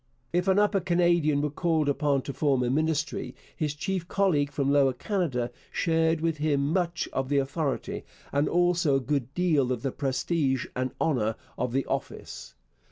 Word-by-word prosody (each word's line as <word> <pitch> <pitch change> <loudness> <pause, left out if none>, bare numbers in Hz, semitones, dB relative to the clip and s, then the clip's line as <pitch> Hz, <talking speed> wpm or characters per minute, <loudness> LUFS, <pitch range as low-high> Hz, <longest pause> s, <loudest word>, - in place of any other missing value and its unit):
If 180 +2 +1
an 190 0 +4
Upper 205 -1 +3
Canadian 170 -4 +2
were 150 - -1
called 160 -1 +1
upon 145 -1 +1
to 140 - -5
form 135 -2 +1
a 120 - 0
Ministry, 150 -3 -1 0.2
his 150 -2 -2
chief 170 +3 -3
colleague 165 -9 +1
from 140 -1 0
Lower 140 -2 +4
Canada 125 - -1 0.2
shared 165 -1 +1
with 165 -1 0
him 145 0 +1
much 170 -2 0
of 135 0 -1
the 145 - +2
authority, 140 +1 -2 0.3
and 140 +1 +1
also 175 -4 +3
a - - +3
good 135 -1 -2
deal 155 -8 +2
of 125 -2 -2
the 135 - 0
prestige 135 -1 0
and 130 0 -1
honour, 115 -8 +1 0.2
of 125 - -2
the 135 +1 0
office. - - -5
145 Hz, 170 wpm, -27 LUFS, 135-170 Hz, 0.3 s, an